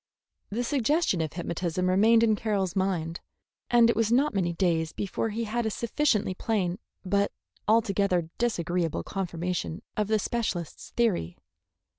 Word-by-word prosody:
The 230 Hz, +4 st, -2 dB
suggestion 275 Hz, -, +1 dB
of 155 Hz, -2 st, -3 dB
hypnotism 175 Hz, +1 st, -2 dB
remained 220 Hz, +5 st, +5 dB
in 220 Hz, -2 st, +4 dB
Carroll's 200 Hz, -5 st, -1 dB
mind, 175 Hz, -4 st, -1 dB, 0.5 s
and 240 Hz, -1 st, +6 dB
it 235 Hz, -, +2 dB
was 225 Hz, 0 st, +1 dB
not 275 Hz, +5 st, +3 dB
many 185 Hz, -4 st, +1 dB
days 165 Hz, -2 st, 0 dB
before 205 Hz, +3 st, -2 dB
he 225 Hz, +2 st, -2 dB
had 235 Hz, +2 st, -1 dB
a 220 Hz, -, 0 dB
sufficiently 225 Hz, -3 st, 0 dB
plain 190 Hz, -2 st, -1 dB, 0.3 s
but 200 Hz, +2 st, +1 dB, 0.4 s
altogether 200 Hz, -6 st, +2 dB
disagreeable 175 Hz, -8 st, 0 dB
confirmation 180 Hz, -3 st, -3 dB
of 210 Hz, -1 st, 0 dB
the 220 Hz, 0 st, +3 dB
specialist's 205 Hz, -7 st, -3 dB
theory. 185 Hz, -, +1 dB
200 Hz, 140 wpm, -27 LUFS, 175-230 Hz, 0.5 s, and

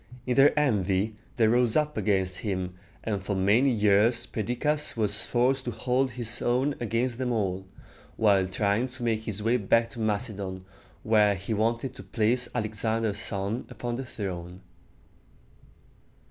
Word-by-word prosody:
In 125 Hz, -, 0 dB
their 140 Hz, +1 st, +7 dB
envy, 105 Hz, -5 st, +1 dB, 0.2 s
they 115 Hz, -4 st, +3 dB
rose 120 Hz, 0 st, +3 dB
up 150 Hz, 0 st, 0 dB
against 95 Hz, -3 st, 0 dB
him; 95 Hz, -4 st, -3 dB, 0.3 s
and 100 Hz, -4 st, -2 dB
for 100 Hz, +1 st, -2 dB
many 105 Hz, +8 st, +3 dB
years 105 Hz, 0 st, +3 dB
Perdiccas 125 Hz, +7 st, -1 dB
was 105 Hz, -1 st, +2 dB
forced 130 Hz, +2 st, +1 dB
to -, -, -2 dB
hold 125 Hz, +4 st, 0 dB
his 120 Hz, -1 st, -3 dB
own 130 Hz, +4 st, +1 dB
against 120 Hz, +1 st, -1 dB
them 125 Hz, -1 st, -1 dB
all, 95 Hz, -4 st, -2 dB, 0.5 s
while 100 Hz, -4 st, +3 dB
trying 100 Hz, +5 st, 0 dB
to 130 Hz, -1 st, -8 dB
make 110 Hz, -2 st, 0 dB
his 105 Hz, -1 st, -4 dB
way 115 Hz, +3 st, +3 dB
back 115 Hz, +2 st, +2 dB
to -, -, -9 dB
Macedon, 100 Hz, -4 st, -2 dB, 0.4 s
where 105 Hz, -2 st, +4 dB
he 100 Hz, +4 st, -4 dB
wanted 115 Hz, +4 st, 0 dB
to 130 Hz, -, -10 dB
place 120 Hz, +3 st, +1 dB
Alexander's 110 Hz, -1 st, -1 dB
son 100 Hz, +4 st, -3 dB
upon 120 Hz, -1 st, -5 dB
the 130 Hz, -, -4 dB
throne. 90 Hz, -6 st, -6 dB
110 Hz, 150 wpm, -27 LUFS, 100-125 Hz, 0.5 s, their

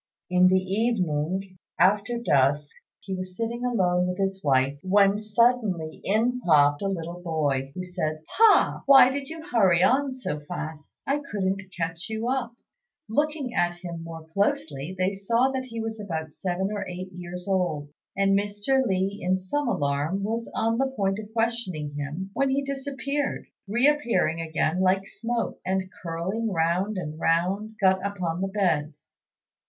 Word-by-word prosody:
In 180 Hz, 0 st, +6 dB
the 185 Hz, +1 st, +4 dB
evening, 185 Hz, -3 st, -1 dB, 0.2 s
after 205 Hz, +6 st, +3 dB
dusk, 145 Hz, -, +2 dB, 0.3 s
he 195 Hz, -, -6 dB
was 185 Hz, -1 st, -6 dB
sitting 235 Hz, +1 st, -3 dB
alone 180 Hz, -7 st, +2 dB
with 180 Hz, 0 st, -3 dB
his 195 Hz, -1 st, -1 dB
wife, 135 Hz, 0 st, +2 dB
when 200 Hz, +1 st, +4 dB
suddenly 215 Hz, -7 st, +1 dB
in 235 Hz, +5 st, +1 dB
popped 145 Hz, -6 st, +4 dB
a 200 Hz, -, 0 dB
little 175 Hz, -2 st, -4 dB
boy, 145 Hz, -6 st, -1 dB
who 185 Hz, -, -4 dB
said, 155 Hz, -4 st, -3 dB
"Pa! 445 Hz, -, +4 dB
why 265 Hz, -2 st, +8 dB
did 275 Hz, 0 st, -4 dB
you 320 Hz, 0 st, -7 dB
hurry 190 Hz, -, +4 dB
on 270 Hz, +4 st, +3 dB
so 250 Hz, -12 st, -4 dB
fast? 150 Hz, +1 st, -8 dB
I 280 Hz, +2 st, +1 dB
couldn't 195 Hz, -1 st, -1 dB, 0.2 s
catch 165 Hz, +3 st, -3 dB
you 220 Hz, +1 st, -3 dB
up." 250 Hz, -2 st, -1 dB, 0.5 s
Looking 295 Hz, +1 st, -1 dB
at 175 Hz, -4 st, +1 dB
him 170 Hz, -2 st, -7 dB
more 165 Hz, -1 st, -8 dB
closely, 160 Hz, -3 st, -1 dB
they 185 Hz, +2 st, +1 dB
saw 230 Hz, +6 st, +2 dB
that 260 Hz, -1 st, -3 dB
he 230 Hz, -2 st, -7 dB
was 225 Hz, 0 st, -4 dB
about 160 Hz, -6 st, -4 dB
seven 190 Hz, +4 st, -2 dB
or 205 Hz, -1 st, -2 dB
eight 185 Hz, +1 st, -6 dB
years 180 Hz, +1 st, -7 dB
old, 175 Hz, -7 st, 0 dB, 0.3 s
and 195 Hz, 0 st, +3 dB
Mr. 205 Hz, +6 st, +1 dB
Li, 195 Hz, -2 st, -1 dB
in 185 Hz, +1 st, +1 dB
some 245 Hz, +10 st, -2 dB
alarm, 155 Hz, -1 st, 0 dB
was 230 Hz, +3 st, -2 dB
on 225 Hz, +1 st, +1 dB
the 270 Hz, -, +2 dB
point 200 Hz, -6 st, -1 dB
of 215 Hz, 0 st, -9 dB
questioning 225 Hz, -10 st, -2 dB
him, 150 Hz, +7 st, -5 dB
when 275 Hz, +4 st, +1 dB
he 275 Hz, +1 st, +1 dB
disappeared, 275 Hz, +1 st, -3 dB, 0.2 s
re 240 Hz, +7 st, +3 dB
appearing 235 Hz, -, +1 dB
again 160 Hz, +2 st, 0 dB
like 190 Hz, +1 st, +2 dB
smoke, 230 Hz, +2 st, -3 dB
and, 190 Hz, 0 st, -1 dB
curling 185 Hz, +7 st, -2 dB
round 180 Hz, +4 st, 0 dB
and 155 Hz, -3 st, -5 dB
round, 190 Hz, +7 st, 0 dB
got 190 Hz, -1 st, +3 dB
upon 180 Hz, -4 st, -2 dB
the 195 Hz, -, 0 dB
bed. 175 Hz, -7 st, 0 dB
190 Hz, 160 wpm, -26 LUFS, 170-230 Hz, 0.5 s, why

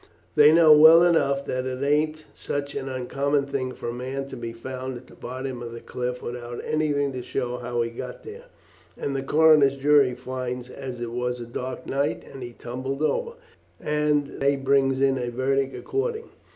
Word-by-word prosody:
They 150 Hz, 0 st, +7 dB
know 160 Hz, -1 st, +7 dB
well 160 Hz, +3 st, +9 dB
enough 140 Hz, -5 st, +2 dB
that 130 Hz, 0 st, -2 dB
it 130 Hz, +1 st, -3 dB
ain't 155 Hz, +2 st, +1 dB
such 140 Hz, 0 st, -4 dB
an 135 Hz, -, -4 dB
uncommon 140 Hz, +2 st, -1 dB
thing 130 Hz, -2 st, -3 dB
for 120 Hz, -, -5 dB
a -, -, -4 dB
man 130 Hz, +2 st, -4 dB
to -, -, -7 dB
be 120 Hz, -2 st, -5 dB
found 130 Hz, +2 st, -6 dB
at 125 Hz, -, -13 dB
the -, -, -17 dB
bottom 130 Hz, 0 st, -6 dB
of 115 Hz, -1 st, -7 dB
the 115 Hz, -, -7 dB
cliff, 125 Hz, +1 st, -4 dB
without 120 Hz, 0 st, -6 dB
anything 145 Hz, -2 st, 0 dB
to 130 Hz, -1 st, -5 dB
show 125 Hz, 0 st, -3 dB
how 120 Hz, -1 st, -2 dB
he 115 Hz, -, -4 dB
got 125 Hz, +2 st, -8 dB
there, 450 Hz, +3 st, -10 dB, 0.5 s
and 140 Hz, -, -3 dB
the 135 Hz, -, -1 dB
coroner's 150 Hz, -1 st, +5 dB
jury 140 Hz, -2 st, +4 dB
finds 125 Hz, 0 st, -5 dB
as 130 Hz, -3 st, -7 dB
it 120 Hz, -1 st, -4 dB
was 125 Hz, +1 st, -2 dB
a 120 Hz, -, -6 dB
dark 125 Hz, +2 st, -6 dB
night 140 Hz, +1 st, -1 dB
and 135 Hz, -, -10 dB
he 120 Hz, -1 st, -7 dB
tumbled 130 Hz, +5 st, -5 dB
over, 470 Hz, -, 0 dB, 0.5 s
and 150 Hz, -1 st, 0 dB
they 140 Hz, +1 st, +3 dB
brings 135 Hz, -1 st, +2 dB
in 135 Hz, -1 st, +2 dB
a 120 Hz, -1 st, -2 dB
verdict 135 Hz, +2 st, 0 dB
according. 455 Hz, +2 st, -3 dB
135 Hz, 190 wpm, -25 LUFS, 125-145 Hz, 0.5 s, well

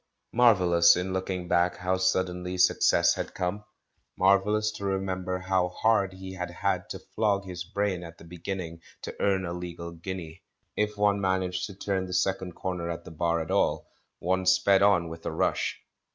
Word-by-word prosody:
Marvellous, 90 Hz, -8 st, +5 dB
in 90 Hz, +1 st, -2 dB
looking 95 Hz, -1 st, -3 dB
back, 85 Hz, 0 st, +2 dB
how 90 Hz, +1 st, -1 dB
suddenlj' 90 Hz, -1 st, -1 dB
suc 90 Hz, -, +4 dB
cess -, -, +4 dB
had -, -, -5 dB
come! 90 Hz, +3 st, -2 dB, 0.3 s
— -, -, -46 dB
marvellous 105 Hz, +3 st, +3 dB
to 110 Hz, -2 st, -9 dB
remember 95 Hz, -1 st, -2 dB
how 95 Hz, -1 st, 0 dB
hard 100 Hz, -1 st, +1 dB
he 95 Hz, 0 st, -8 dB
had 90 Hz, -1 st, -4 dB
had -, -, -2 dB
to -, -, -4 dB, 0.2 s
flog 100 Hz, -2 st, +1 dB
his 90 Hz, -2 st, -6 dB
brain 100 Hz, 0 st, -2 dB
at 85 Hz, 0 st, -10 dB
the -, -, -14 dB
beginning 85 Hz, 0 st, -6 dB, 0.2 s
to -, -, -6 dB
earn 95 Hz, -2 st, +1 dB
a 85 Hz, -, -4 dB
legal 85 Hz, -1 st, -6 dB
guinea; 85 Hz, -1 st, -7 dB, 0.3 s
if 105 Hz, 0 st, -1 dB
one 100 Hz, -1 st, +2 dB
managed 95 Hz, -1 st, 0 dB
to 100 Hz, -, -10 dB
turn 95 Hz, -1 st, -2 dB
the 90 Hz, -, -6 dB
second 95 Hz, 0 st, 0 dB
corner 90 Hz, -2 st, -4 dB
at 85 Hz, -, -5 dB
the -, -, -9 dB
Bar 85 Hz, +1 st, 0 dB
at 80 Hz, -, -5 dB
all, -, -, +1 dB, 0.3 s
one 95 Hz, +1 st, -1 dB
sped 95 Hz, +1 st, +5 dB
on 100 Hz, -4 st, +4 dB
with 80 Hz, 0 st, -9 dB
a -, -, -3 dB
rush. -, -, 0 dB
95 Hz, 185 wpm, -27 LUFS, 90-95 Hz, 0.3 s, Marvellous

